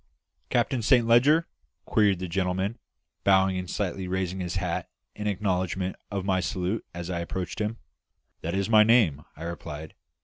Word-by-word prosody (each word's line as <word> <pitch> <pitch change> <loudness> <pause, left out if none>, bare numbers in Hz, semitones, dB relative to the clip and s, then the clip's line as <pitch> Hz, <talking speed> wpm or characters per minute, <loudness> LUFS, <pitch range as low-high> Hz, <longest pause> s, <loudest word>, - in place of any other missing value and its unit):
"Captain 125 +1 +1
Saint 120 +1 +4
Leger?" 140 +8 +5 0.4
queried 105 -3 +3
the 90 +1 -4
gentleman, 95 +5 -1 0.4
bowing 95 -1 +4
and 90 -1 -4
slightly 95 -2 -2
raising 95 0 -2
his 90 0 -3
hat 90 -3 -2 0.2
in 105 0 -4
acknowledgment 95 -2 -1
of 100 -2 -3
my 95 -2 +2
salute 95 +3 -2
as 85 +1 -5
I 85 - -2
approached 90 +3 -4
him. 105 +2 -2 0.6
"That 85 +3 -2
is 100 0 0
my 110 -1 +7
name," 105 - +4
I 80 - -9
replied. 80 -2 -6
95 Hz, 160 wpm, -27 LUFS, 90-105 Hz, 0.6 s, my